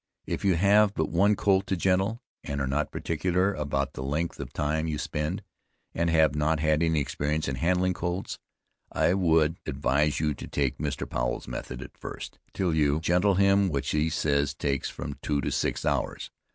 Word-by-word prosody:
If -, -, -3 dB
you 95 Hz, -3 st, +3 dB
have 100 Hz, +3 st, +4 dB
but 80 Hz, -, -1 dB
one 100 Hz, +5 st, +4 dB
colt 95 Hz, -1 st, +2 dB
to 95 Hz, -, 0 dB
gentle, 95 Hz, +7 st, +1 dB, 0.2 s
and 70 Hz, -1 st, -3 dB
are 70 Hz, -, 0 dB
not 70 Hz, +3 st, -1 dB
particular 90 Hz, +4 st, 0 dB
about 70 Hz, -3 st, -2 dB
the -, -, -6 dB
length 75 Hz, +5 st, -2 dB
of -, -, -6 dB
time 80 Hz, +2 st, -1 dB
you 75 Hz, -2 st, -2 dB
spend, 75 Hz, +1 st, -3 dB, 0.5 s
and 85 Hz, 0 st, 0 dB
have 80 Hz, -3 st, +4 dB
not 75 Hz, +1 st, +1 dB
had 75 Hz, 0 st, +2 dB
any 80 Hz, -2 st, +2 dB
experience 75 Hz, +2 st, -1 dB
in 70 Hz, -, -1 dB
handling 90 Hz, +7 st, +1 dB
colts, 90 Hz, +2 st, -3 dB, 0.5 s
I 85 Hz, -, +2 dB
would 80 Hz, -4 st, +2 dB
advise 75 Hz, +2 st, +1 dB
you 75 Hz, -1 st, +1 dB
to -, -, -8 dB
take 70 Hz, -3 st, -1 dB
Mr. 70 Hz, -2 st, -3 dB
Powel's -, -, -2 dB
method 65 Hz, 0 st, -6 dB
at -, -, -13 dB
first, -, -, -8 dB
till 90 Hz, -4 st, 0 dB
you 75 Hz, -1 st, +2 dB
gentle 90 Hz, +4 st, +2 dB
him, 100 Hz, 0 st, +4 dB
which 70 Hz, -4 st, -2 dB
he 75 Hz, +1 st, +1 dB
says 70 Hz, -2 st, 0 dB
takes 70 Hz, -2 st, -1 dB
from 70 Hz, -2 st, -7 dB
two 75 Hz, -1 st, 0 dB
to 70 Hz, -, -2 dB
six -, -, -1 dB
hours. -, -, -1 dB
80 Hz, 190 wpm, -27 LUFS, 75-90 Hz, 0.5 s, have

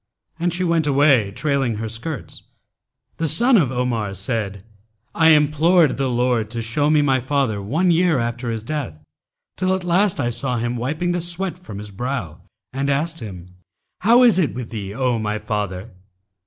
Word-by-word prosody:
And 175 Hz, +1 st, 0 dB
she 175 Hz, +2 st, -2 dB
went 165 Hz, -3 st, +1 dB
away 135 Hz, -7 st, +4 dB
trailing 135 Hz, +1 st, -1 dB
her 110 Hz, +1 st, -4 dB
skirts.[FN#282] 120 Hz, +7 st, -7 dB, 0.7 s
The 165 Hz, -, -1 dB
son 240 Hz, -, +4 dB
of 150 Hz, -, +3 dB
Omar 120 Hz, -6 st, -2 dB
said, 100 Hz, -1 st, -3 dB, 0.5 s
'I 160 Hz, -1 st, +4 dB
implored 155 Hz, +1 st, +4 dB
the 135 Hz, -1 st, 0 dB
Lord 120 Hz, -3 st, 0 dB
to 115 Hz, +1 st, -4 dB
show 145 Hz, +7 st, 0 dB
me 155 Hz, -1 st, +4 dB
my 135 Hz, -2 st, +2 dB
father 130 Hz, -5 st, -1 dB
one 160 Hz, -, +1 dB
year 170 Hz, -2 st, +3 dB
after 120 Hz, 0 st, -2 dB
his 110 Hz, -1 st, -3 dB
death, 140 Hz, -, -4 dB, 0.6 s
till 185 Hz, 0 st, +1 dB
at 190 Hz, -, -5 dB
last 180 Hz, +2 st, +2 dB
I 120 Hz, -, 0 dB
saw 125 Hz, +1 st, -2 dB
him 120 Hz, +1 st, -2 dB
wiping 155 Hz, +9 st, -2 dB
the 175 Hz, 0 st, -1 dB
sweat 175 Hz, 0 st, -3 dB
from 145 Hz, -, -9 dB
his 105 Hz, 0 st, -7 dB
brow 100 Hz, -, -4 dB, 0.3 s
and 135 Hz, +1 st, -1 dB
asked 155 Hz, +4 st, -1 dB
him, 90 Hz, -5 st, -9 dB, 0.5 s
'How 235 Hz, +5 st, +5 dB
is 230 Hz, -6 st, +5 dB
it 155 Hz, -9 st, 0 dB
with 120 Hz, -3 st, -6 dB
thee, 100 Hz, -4 st, -5 dB
O 125 Hz, -2 st, 0 dB
my 105 Hz, 0 st, -2 dB
father?' 105 Hz, -1 st, -4 dB
130 Hz, 180 wpm, -21 LUFS, 115-165 Hz, 0.7 s, How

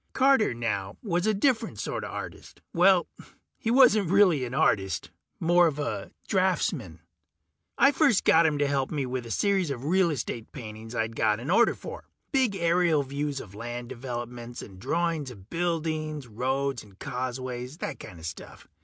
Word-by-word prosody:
Carter, 265 Hz, -4 st, +4 dB
now, 105 Hz, -4 st, -3 dB
was 175 Hz, -2 st, 0 dB
a 215 Hz, -, +3 dB
different 240 Hz, +2 st, +1 dB
sorta -, -, -3 dB
artist. -, -, -8 dB
Well, 180 Hz, +1 st, +5 dB, 0.5 s
he 225 Hz, -, -2 dB
wasn't 230 Hz, -7 st, +5 dB
really 185 Hz, -7 st, +5 dB
an 125 Hz, +1 st, -5 dB
artist 95 Hz, -, +1 dB, 0.3 s
more 175 Hz, +1 st, +5 dB
of 150 Hz, -3 st, -2 dB
a 145 Hz, 0 st, -3 dB, 0.2 s
draftsman. 170 Hz, -, 0 dB, 0.8 s
I 275 Hz, -, +6 dB
first 275 Hz, -, +3 dB
got 165 Hz, 0 st, +5 dB
him 155 Hz, -, +1 dB
in -, -, -3 dB
to 145 Hz, -, +3 dB
help 135 Hz, -2 st, 0 dB
me 145 Hz, -3 st, -2 dB
with 125 Hz, -1 st, -4 dB
a -, -, -9 dB
series 195 Hz, -, +1 dB
of 135 Hz, -1 st, -4 dB
real 180 Hz, +2 st, +3 dB
estate 120 Hz, -5 st, -4 dB
paintings 110 Hz, -2 st, -8 dB
I'd 110 Hz, 0 st, -1 dB
got 105 Hz, -1 st, +2 dB
an 130 Hz, +8 st, -3 dB
order 235 Hz, +5 st, +4 dB
for. -, -, -9 dB, 0.3 s
Big 260 Hz, -8 st, +2 dB
aerial 170 Hz, -3 st, +2 dB
views 140 Hz, +1 st, -3 dB
of 100 Hz, -6 st, -10 dB
land 120 Hz, +2 st, -6 dB
developments, 120 Hz, -1 st, -6 dB
and 95 Hz, -3 st, -12 dB
drawings 165 Hz, -, -1 dB
of 100 Hz, -4 st, -13 dB
buildings, 155 Hz, -4 st, -2 dB
roads 130 Hz, +3 st, -1 dB
and 100 Hz, -3 st, -17 dB
causeways, 125 Hz, +2 st, -4 dB
that -, -, -5 dB
kinda 85 Hz, -3 st, -11 dB
stuff. 85 Hz, 0 st, -8 dB
145 Hz, 170 wpm, -27 LUFS, 120-175 Hz, 0.8 s, I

